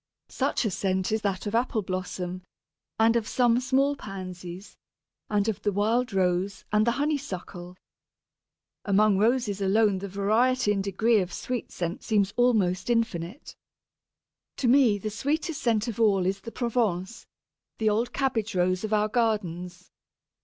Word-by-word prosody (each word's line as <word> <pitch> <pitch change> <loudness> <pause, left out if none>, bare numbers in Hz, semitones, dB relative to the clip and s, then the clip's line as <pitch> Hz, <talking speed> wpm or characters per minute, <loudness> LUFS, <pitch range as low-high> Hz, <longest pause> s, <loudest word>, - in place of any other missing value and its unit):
Such - - -1
a 215 - 0
scent 190 +1 -1
is 220 0 0
that 195 -2 -2
of 205 - -3
Apple 230 -2 0
blossom, 185 -1 -4 0.6
and 225 +1 +4
of 225 -2 0
some 240 -1 +3
small 270 +3 +1
Pansies, 185 -3 -8 0.5
and 210 0 +1
of 220 -4 -2
the 205 - 0
wild 225 +5 +1
Rose 190 0 0
and 210 +2 +3
the 235 - +3
Honeysuckle. 200 - -4 1.1
Among 205 0 +3
Roses 220 -3 +1
alone 200 0 +3
the 200 - -5
variety 215 +5 +2
and 200 -1 0
degree 215 +3 +2
of 180 -2 -2
sweet 245 +5 -4
scent 175 0 -4
seems 205 -3 +1
almost 215 -6 +2
infinite. 225 - -2 1.0
To 255 - 0
me 245 -4 +5
the 215 +2 -5
sweetest 295 - -2 0.2
of 230 -1 -5
all 200 -5 +3
is 195 +1 -1
the 230 - -8
Provence, 225 -5 -2 0.5
the 215 -1 +2
old 230 +3 0
Cabbage 230 -6 -1
Rose 185 +1 +1
of 215 0 -2
our 210 0 +3
gardens. 180 -6 -2
210 Hz, 145 wpm, -27 LUFS, 190-235 Hz, 1.1 s, me